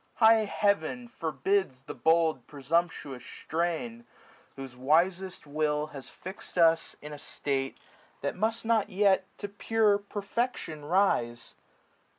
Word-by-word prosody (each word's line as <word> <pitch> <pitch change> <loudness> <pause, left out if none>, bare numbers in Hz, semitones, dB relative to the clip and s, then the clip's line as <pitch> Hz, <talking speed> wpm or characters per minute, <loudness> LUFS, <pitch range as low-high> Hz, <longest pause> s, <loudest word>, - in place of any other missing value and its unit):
High 220 -1 +6
Heaven 205 +4 0
forbids 190 - -1
the - - -7
bold 160 -5 +2
presumptuous 145 -2 -1
strain, 175 - -3 0.5
Whose 135 -3 -8
wisest 175 +9 +1
will 150 0 0
has 135 -2 -8
fix'd 190 0 -10
us 165 -1 +4
in 150 0 -7
a 145 - -8
state 135 -2 -2 0.4
That 140 - -2
must 225 +4 -1
not 225 -2 +2
yet 190 -1 +3
to 205 - -5
pure 205 0 +2
perfection 200 - -3
rise. 135 -10 +1
170 Hz, 120 wpm, -29 LUFS, 150-205 Hz, 0.5 s, High